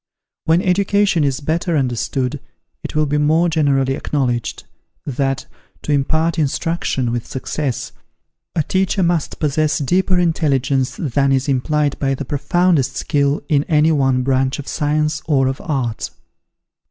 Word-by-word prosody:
When 165 Hz, +4 st, +3 dB
education 195 Hz, -2 st, +2 dB
is 140 Hz, 0 st, 0 dB
better 165 Hz, +2 st, 0 dB
understood, 125 Hz, 0 st, -1 dB, 0.4 s
it -, -, -6 dB
will 155 Hz, 0 st, +3 dB
be 150 Hz, +1 st, 0 dB
more 160 Hz, +4 st, +3 dB
generally 140 Hz, -4 st, +2 dB
acknowledged, 125 Hz, -4 st, -2 dB, 0.4 s
that, 135 Hz, 0 st, -1 dB, 0.4 s
to -, -, -2 dB
impart 160 Hz, +4 st, +1 dB
instruction 145 Hz, -4 st, -1 dB
with 120 Hz, -1 st, -3 dB
success, 135 Hz, 0 st, -3 dB, 0.6 s
a 155 Hz, -, +2 dB
teacher 190 Hz, +3 st, 0 dB
must 170 Hz, -3 st, 0 dB
possess 155 Hz, 0 st, +1 dB
deeper 180 Hz, +6 st, +1 dB
intelligence 140 Hz, -6 st, +1 dB
than 140 Hz, -1 st, +1 dB
is 135 Hz, 0 st, +1 dB
implied 145 Hz, +2 st, 0 dB
by 135 Hz, -1 st, 0 dB
the 145 Hz, -, -5 dB
profoundest 165 Hz, +1 st, +1 dB
skill 140 Hz, 0 st, 0 dB
in 145 Hz, -3 st, +2 dB
any 155 Hz, -1 st, +3 dB
one 135 Hz, -4 st, +2 dB
branch 130 Hz, 0 st, +1 dB
of 145 Hz, -, -8 dB
science 150 Hz, 0 st, 0 dB
or 135 Hz, -4 st, +3 dB
of 130 Hz, 0 st, -3 dB
art. 130 Hz, -8 st, -2 dB
145 Hz, 140 wpm, -19 LUFS, 135-160 Hz, 0.6 s, When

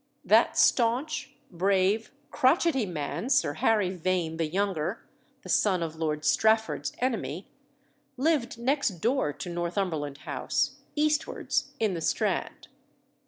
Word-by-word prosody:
That -, -, +4 dB
staunch, 250 Hz, +6 st, +2 dB, 0.2 s
brave, 195 Hz, +4 st, +1 dB, 0.2 s
crotchety 270 Hz, -, +2 dB
man, 165 Hz, -, -4 dB
Sir 265 Hz, -, +3 dB
Harry 205 Hz, +3 st, +2 dB
Vane 180 Hz, -2 st, -1 dB
the 165 Hz, -1 st, 0 dB
younger 185 Hz, +1 st, -2 dB, 0.4 s
(the -, -, -10 dB
son 185 Hz, -5 st, +2 dB
of 160 Hz, -1 st, -5 dB
Lord 155 Hz, -1 st, -2 dB
Strafford's 220 Hz, 0 st, +2 dB
enemy), 250 Hz, -2 st, -2 dB, 0.7 s
lived 275 Hz, -4 st, +1 dB
next 240 Hz, -, 0 dB
door 235 Hz, -, +1 dB
to -, -, -7 dB
Northumberland 170 Hz, -4 st, -2 dB
House, -, -, -1 dB, 0.2 s
eastwards, 305 Hz, 0 st, 0 dB
in 215 Hz, -4 st, +1 dB
the 170 Hz, -, -4 dB
Strand. 160 Hz, -, -1 dB
195 Hz, 120 wpm, -28 LUFS, 165-240 Hz, 0.7 s, That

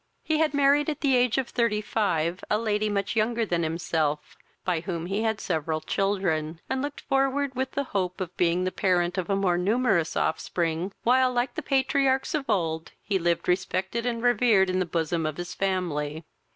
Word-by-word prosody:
He 315 Hz, -1 st, 0 dB
had 310 Hz, -2 st, +2 dB
married 285 Hz, +1 st, +4 dB
at 300 Hz, -1 st, -4 dB
the 270 Hz, -3 st, +3 dB
age 245 Hz, 0 st, +2 dB
of 265 Hz, -2 st, 0 dB
thirty 235 Hz, -3 st, +1 dB
five 185 Hz, -5 st, -1 dB
a 210 Hz, -, +3 dB
lady 215 Hz, -1 st, 0 dB
much 200 Hz, +1 st, -1 dB
younger 225 Hz, +1 st, +1 dB
than 175 Hz, -4 st, 0 dB
himself, 160 Hz, -2 st, -1 dB, 0.3 s
by 180 Hz, -3 st, +1 dB
whom 170 Hz, -1 st, -4 dB
he 195 Hz, +4 st, -1 dB
had 220 Hz, -2 st, 0 dB
several 160 Hz, -2 st, -1 dB
children, 165 Hz, -3 st, -1 dB
and 265 Hz, -, -1 dB
looked 290 Hz, +1 st, -5 dB
forward 270 Hz, 0 st, 0 dB
with 260 Hz, +1 st, -3 dB
the 280 Hz, -, 0 dB
hope 185 Hz, -6 st, -2 dB
of 180 Hz, -2 st, -5 dB
being 175 Hz, +1 st, +2 dB
the 185 Hz, -, -1 dB
parent 180 Hz, -1 st, +1 dB
of 180 Hz, -, -4 dB
a 195 Hz, -, +2 dB
more 185 Hz, -3 st, +1 dB
numerous 200 Hz, -4 st, +1 dB
offspring, 165 Hz, +2 st, -1 dB
while, 255 Hz, +1 st, +4 dB
like 245 Hz, 0 st, 0 dB
the 310 Hz, -, -4 dB
patriarchs 270 Hz, 0 st, +1 dB
of 290 Hz, -5 st, -2 dB
old, 165 Hz, -6 st, -1 dB
he 195 Hz, -2 st, 0 dB
lived 170 Hz, -1 st, 0 dB
respected 190 Hz, +5 st, -1 dB
and 230 Hz, -1 st, -2 dB
revered 225 Hz, -6 st, +4 dB
in 185 Hz, -, 0 dB
the 185 Hz, -, 0 dB
bosom 165 Hz, 0 st, -1 dB
of 155 Hz, -, -4 dB
his 175 Hz, 0 st, -5 dB
family. 170 Hz, -5 st, -2 dB
195 Hz, 190 wpm, -26 LUFS, 175-245 Hz, 0.3 s, married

